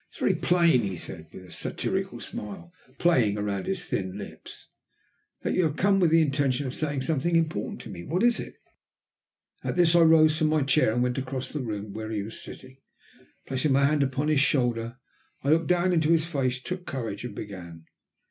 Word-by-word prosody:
"It - - -23
is - - -13
very - - +3
plain," 170 -7 +3
he 95 -3 -3
said, 80 -1 -8
with 90 - -11
a 90 - -15
satirical - - -3
smile 105 - -8 0.2
playing 125 -12 +3
round 100 -2 -3
his 190 -2 -2
thin 95 0 -3
lips, 100 - -10 0.8
"that - - 0
you 185 - +2
have 155 -4 0
come 195 +3 +3
with 175 -3 +4
the 165 0 +5
intention 140 -2 0
of 130 - -4
saying 145 -3 -2
something 165 +3 0
important 155 -11 -1
to - - -10
me. 85 -2 -8
What 175 - -1
is 240 -1 +3
it?" - - -7 1.1
At - - -2
this 175 -2 +4
I 170 - +7
rose 160 -1 +5
from 155 - +3
my 155 -1 +2
chair 135 -3 +3
and 120 +2 +1
went 125 +1 0
across 130 0 -5
the 150 - -2
room 105 -4 -5
to - - -7
where 110 0 -5
he 105 -2 -2
was 110 +2 -8
sitting. 130 0 -11 0.7
Placing 135 +2 0
my 140 +1 +4
hand 150 +1 +2
upon 135 +2 0
his 155 -2 +3
shoulder 120 -4 +1 0.5
I 140 - 0
looked 165 +1 +3
down 180 0 +2
into 160 -2 +2
his 165 -1 +3
face, 135 -6 -1
took 180 +6 -6
courage, 115 -6 -4
and 125 - -6
began. 85 -5 -8
135 Hz, 210 wpm, -27 LUFS, 110-160 Hz, 1.1 s, I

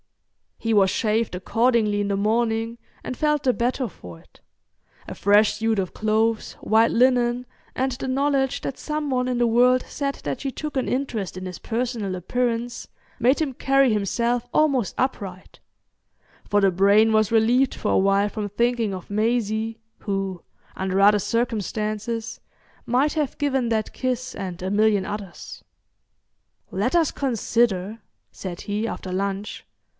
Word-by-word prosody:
He 225 -1 -1
was 195 -2 +4
shaved 220 -1 0
accordingly 220 +1 +1
in 205 - -1
the 200 - 0
morning, 225 +2 0 0.3
and 255 - -5
felt 300 -1 +1
the 255 - +3
better 245 +2 -1
for 90 - -12
it. - - -23 0.7
A - - -6
fresh 205 +2 +4
suit 220 0 0
of 185 -2 -3
clothes, 220 +1 0
white 225 +1 +2
linen, 245 0 +2 0.3
and 265 +1 0
the 265 +2 -5
knowledge 270 0 +1
that 270 - -4
some 300 -1 -3
one 250 -1 0
in 250 -1 -1
the 240 - +3
world 250 +2 +4
said 275 -1 -3
that - - -3
she 275 - -2
took 300 +2 -6
an 260 - 0
interest 240 -9 -2
in 185 - -6
his 180 -1 -6
personal 230 -5 -2
appearance 240 +5 -2 0.3
made 255 +6 +3
him 285 -4 -1
carry 270 0 +3
himself 235 +4 0
almost 275 -8 +2
upright; 195 -8 -3 0.9
for 205 0 +2
the 195 -1 +4
brain 200 +4 +4
was 215 -1 +2
relieved 240 +4 +3
for - - -2
a - - +4
while 195 +1 +3
from 205 -1 -4
thinking 235 0 0
of 185 - -10
Maisie, 220 +1 0 0.2
who, 195 -3 -3 0.3
under 190 0 -1
other 205 +1 +6
circumstances, 220 0 -2 0.5
might 265 +5 +2
have 300 -4 -2
given 270 -4 0
that 220 -2 -1
kiss 255 0 -3
and 185 -3 -6
a 185 +1 -2
million 210 -2 +3
others. 200 -3 -7 1.1
"Let - - 0
us 330 -3 +3
consider," 225 -5 0 0.3
said 180 -2 -7
he, 210 +2 -2
after 190 -4 -5
lunch. 200 +2 -3
225 Hz, 155 wpm, -23 LUFS, 205-250 Hz, 1.1 s, other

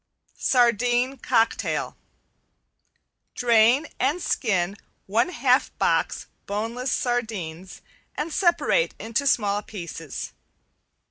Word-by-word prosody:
~SARDINE 245 +1 +2
COCKTAIL~ 230 -2 0 1.4
Drain 240 +4 +4
and 280 +7 +1
skin 195 - 0 0.3
one 225 - +1
half 260 -5 +2
box - - 0 0.2
boneless 230 +5 -3
sardines 195 -8 -3 0.3
and 305 +2 -3
separate 390 +7 +2
into 230 +5 -2
small 205 -5 +2
pieces. 170 -7 -7
235 Hz, 80 wpm, -24 LUFS, 205-260 Hz, 1.4 s, Drain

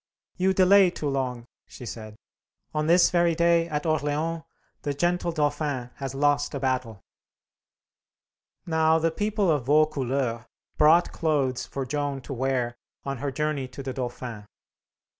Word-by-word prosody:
"You 190 +1 +1
delay 190 0 +6
too 155 -4 -5
long," 130 -3 -2 0.2
she 125 - -11
said. 110 -2 -8 0.6
"On 155 0 -1
this 175 +1 +5
very 170 -2 +3
day, 170 0 +3
at 150 0 -2
Orleans, 155 +1 -1 0.4
the 145 -2 -3
gentle 175 +3 0
Dauphin 145 -5 -1
has 135 -1 -5
lost 145 +1 +1
a - - -2
battle." 125 -6 -2 1.6
Now 160 -1 +3
the 165 0 +1
people 205 0 0
of 145 -6 0
Vaucouleurs 135 -5 +1 0.3
brought 160 +3 +5
clothes 140 -6 0
for 135 -1 -4
Joan 145 +1 -2
to 135 - -7
wear 130 -2 -1 0.3
on 140 -1 -4
her 140 +1 -2
journey 150 -1 -2
to 135 +2 -9
the 130 -1 -4
Dauphin. 120 -4 -6
145 Hz, 140 wpm, -26 LUFS, 130-165 Hz, 1.6 s, delay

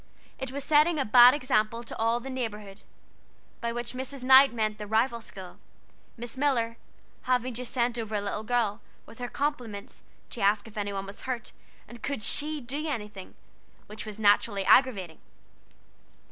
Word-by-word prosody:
It 265 -1 -5
was 280 +1 -4
setting 310 +3 +4
a 275 - 0
bad 245 +4 +8
example 230 -4 0
to 225 - -7
all 230 +1 +1
the 265 +2 -7
neighborhood 210 -5 -5 0.8
by 235 -1 -2
which 240 +1 -5
Mrs. 260 +1 -5
Knight 265 +1 +8
meant 215 -2 -2
the 210 - -6
rival 230 +2 +1
school, 190 -4 -11 0.6
Miss 240 +2 -6
Miller 235 -5 +1 0.5
having 250 0 +1
just 245 +1 -5
sent 240 -1 0
over 220 -1 -4
a 205 - 0
little 200 +1 -3
girl, 230 -1 -1 0.2
with 225 - -15
her 245 - -3
compliments, 245 -8 -4 0.3
to 235 - -6
ask 205 +1 +2
if 220 - -14
any 205 -1 -3
one 195 0 -4
was 200 +1 -10
hurt, 250 -3 -4 0.4
and 235 +1 -12
could 280 -6 -3
she 300 +7 0
do 280 +5 -4
anything? 210 -7 -6 0.5
which 215 +1 -8
was 210 -1 -7
naturally 205 -1 +2
aggravating! 195 -12 +3
235 Hz, 170 wpm, -28 LUFS, 210-255 Hz, 0.8 s, bad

